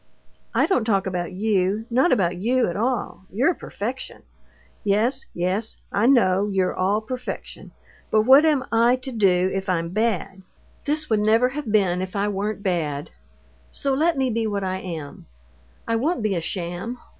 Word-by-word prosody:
"I - - +4
don't 320 - +1
talk 200 -4 +1
about 180 -2 -3
you, 200 +1 0
not 260 +9 +3
about 185 -6 +2
you 245 +7 +1
at 170 - -3
all. 230 -3 -2
You're 260 - +2
perfection. 245 -3 -6 0.6
Yes, 225 +7 +1
yes, 185 +6 -2
I 210 +4 +2
know 205 -7 +4
you're 190 -2 +1
all 200 +4 +1
perfection; 250 +3 -7 0.4
but 215 -1 +3
what 265 +5 +7
am 295 -5 +2
I 230 +2 +4
to 255 +1 -6
do 190 -5 +2
if 195 0 -3
I'm 170 -2 0
bad? 195 -2 -1 0.4
This 305 +1 -1
would 215 - +3
never 225 +4 +3
have 270 -4 -5
been 185 -4 +2
if 185 +1 -5
I 205 +1 0
weren't 205 +1 -3
bad. 155 -7 -2 0.6
So 275 -1 -1
let 315 +3 +2
me 260 -2 +1
be 225 0 0
what 200 -2 -2
I 185 0 -2
am. 165 -6 -7 0.6
I 230 - +1
won't 290 +1 0
be 215 -2 +1
a 170 - -1
sham. 175 +7 -4
210 Hz, 170 wpm, -23 LUFS, 185-250 Hz, 0.6 s, what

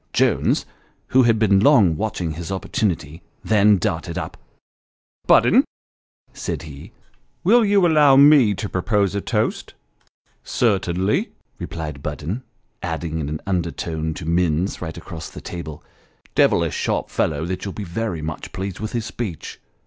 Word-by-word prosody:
Jones, - - +2 0.4
who 130 - +5
had 115 -3 +4
been 100 -3 +4
long 105 - +5
watching 90 -3 -2
his 85 +4 -6
opportunity, 90 -5 -2 0.2
then 105 -1 +4
darted 85 -4 -2
up. - - -5 0.5
" - - -45
Budden," - - +6 0.7
said 70 - -4
he, 75 -3 -11 0.3
" - - -43
will 230 +6 +5
you 205 -1 +3
allovr 150 -6 +5
me 140 -8 +6
to 105 - -4
propose 100 +1 0
a 100 - -2
toast? - - -2 0.4
" - - -86 0.2
"Certainly," 95 -3 0 0.3
replied 75 -4 -6
Budden, 75 - -4 0.4
adding 80 -1 -3
in 75 -2 -3
an 75 0 -4
undertone 85 -3 -2
to 90 - -7
Minus 85 +2 0
right 80 -2 -5
across 80 -1 -8
the - - -10
table. 80 -4 -8 0.3
" - - -32
Devilish - - +3
sharp - - -2
fellow 75 +1 0
that: 90 +1 -4
you'll 100 - -4
be 105 - -6
very 85 -2 -3
much 80 0 -6
pleased 95 -1 -5
with 110 0 -5
his 115 -2 -2
speech. 110 -8 -6
95 Hz, 155 wpm, -21 LUFS, 80-110 Hz, 0.7 s, Budden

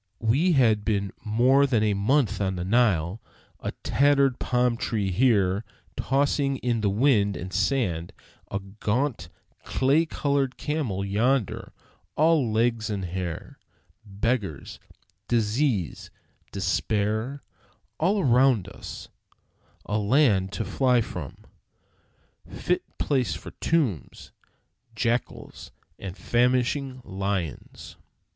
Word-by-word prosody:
We 135 - +2
had 110 -7 +3
been 100 -3 -1
more 125 +6 +4
than 115 -5 +2
a 105 -1 +2
month 110 +4 +1
on 95 -1 0
the 90 0 -4
Nile; 100 -3 +2 0.4
a - - -4
tattered 140 -2 +3
palm 125 -1 +1
tree 105 -4 -2
here 100 -2 +2 0.3
tossing 140 0 +1
in 120 -3 -1
the 105 - +2
wind 100 -3 +2
and 90 +1 -7
sand; 90 - 0 0.4
a 100 - -2
gaunt, 105 - -2 0.3
clay 145 +5 +2
colored 140 -3 -1
camel 130 -11 -2
yonder, 115 +3 0 0.4
all 155 -6 +3
legs 115 0 +1
and 100 -3 -3
hair; 90 -1 -5 0.4
beggars, 100 - -3 0.5
disease, 115 - 0 0.4
despair 110 +6 -1 0.6
all 195 +5 +2
around 125 - +3
us; - - -9 0.8
a 105 +1 -1
land 105 -4 +3
to 110 - -3
fly 125 -2 +2
from, 85 - -7 1.0
fit - - -1 0.2
place 130 -4 0
for - - -9
tombs, 135 - -1 0.6
jackals, 120 +2 -3 0.3
and 95 0 -7
famishing 125 +2 0
lions! 95 -4 -4
115 Hz, 105 wpm, -26 LUFS, 100-135 Hz, 1.0 s, more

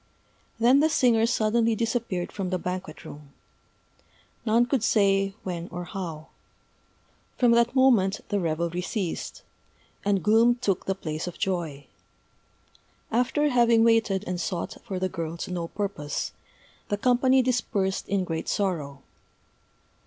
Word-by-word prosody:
Then 245 +4 +5
the 310 +2 +3
singer 235 -6 +3
suddenly 230 -1 +2
disappeared 225 -5 -2
from 195 -3 -4
the 185 - 0
banquet 180 -2 -6
room 145 -1 -11 1.1
none 230 +2 +4
could 250 -2 0
say 195 -3 +2
when 175 -2 -4
or 175 -1 -6
how. 165 -3 -6 1.1
From 245 -2 +4
that 235 +2 +3
moment 225 -7 +4
the 205 - 0
revelry 170 +1 -1
ceased; 185 -2 -4 0.6
and 200 -2 +1
gloom 225 +3 +5
took 205 -7 -2
the 195 - 0
place 155 -3 -5
of 175 - -6
joy. 165 -7 -2 1.3
After 250 +6 +2
having 235 -3 +4
waited 225 -4 +3
and 180 -1 -3
sought 185 +4 -3
for 195 -5 -5
the 185 +1 0
girl 165 -2 -5
to 175 - -5
no 170 -2 -3
purpose, 195 -7 -3 0.6
the 205 - 0
company 255 +3 +3
dispersed 215 -6 -1
in 195 -1 +1
great 165 -2 -4
sorrow. 150 -9 -2
195 Hz, 135 wpm, -26 LUFS, 175-235 Hz, 1.3 s, Then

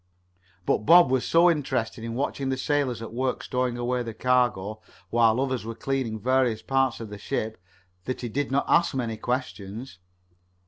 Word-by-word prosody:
But - - +2
Bob 165 - +6
was 130 -2 +2
so 170 +1 +5
interested 130 -8 0
in 115 0 -4
watching 135 0 -2
the 130 - -1
sailors 130 -4 0
at 115 - -8
work 130 +1 -1
stowing 125 -1 -1
away 125 +1 -1
the 115 -2 -6
cargo, 115 -5 +1 0.3
while 115 0 +4
others 130 -3 -1
were 115 +1 -6
cleaning 130 -4 -2
various 125 -2 +1
parts 135 -2 +1
of 115 -2 -7
the 105 - -7
ship, 110 -1 -3 0.4
that 130 - -3
he 120 - -3
did 140 +5 -2
not 140 +1 +1
ask 170 -4 +3
many 115 -4 -2
questions. 115 -3 -4
125 Hz, 175 wpm, -26 LUFS, 115-135 Hz, 0.4 s, Bob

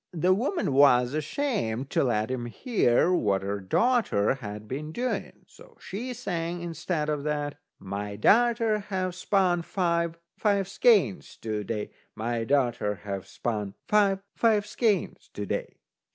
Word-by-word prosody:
The 180 +2 +3
woman 245 - 0
was 125 -2 +5
ashamed 150 - -2
to - - +2
let 115 -2 0
him 120 -2 -3
hear 180 - +2
what 100 - +1
her 100 +1 -2
daughter 170 - +2
had 105 -5 -7
been 150 +6 -5
doing, 250 +8 -3
so 485 -1 -18
she 235 +7 -5
sang, 175 -8 -3
instead 165 -2 -2
of 150 -2 -1
that: 145 -1 -2 0.2
"My 100 +1 -5
darter 225 - +3
ha' 185 -3 -3
spun 180 -1 +1
five, 170 -2 0 0.2
five 200 -3 +2
skeins 195 - +2
to 110 -2 -2
day. 105 0 -4 0.2
My 115 +1 -2
darter 120 -6 +1
ha' 100 -2 -3
spun 105 -4 -4
five, 200 -2 +3
five 215 -3 +3
skeins 210 -3 -1
to 105 - -3
day." - - -3
155 Hz, 140 wpm, -27 LUFS, -, 0.2 s, was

